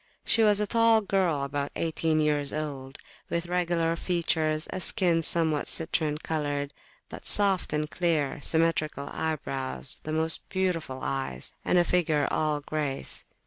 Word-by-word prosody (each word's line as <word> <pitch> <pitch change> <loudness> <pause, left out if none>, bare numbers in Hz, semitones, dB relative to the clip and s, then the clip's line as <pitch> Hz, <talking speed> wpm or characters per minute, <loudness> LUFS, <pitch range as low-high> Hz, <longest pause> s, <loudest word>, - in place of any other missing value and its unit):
She 230 - +4
was 210 -2 +5
a 210 - +1
tall 230 +1 +4
girl, 185 -8 0
about 140 0 -3
eighteen 160 -1 0
years 150 -2 +1
old, 140 -3 -5 0.3
with 170 0 -2
regular 170 -2 0
features, 160 -3 0
a 185 - -3
skin 175 -2 +2
somewhat 160 -2 +3
citrine 155 -2 0
coloured, 145 -2 -2 0.4
but - - -8
soft 200 -3 +3
and 150 0 -1
clear, 150 -4 -1
symmetrical 160 -2 0
eyebrows, 135 -4 -4
the 155 - -6
most 160 +1 +2
beautiful 165 -8 -2
eyes, 135 - -3
and - - +2
a 175 - +5
figure 160 -5 +1
all 150 -1 0
grace. 145 -2 -3
160 Hz, 145 wpm, -27 LUFS, 145-175 Hz, 0.4 s, was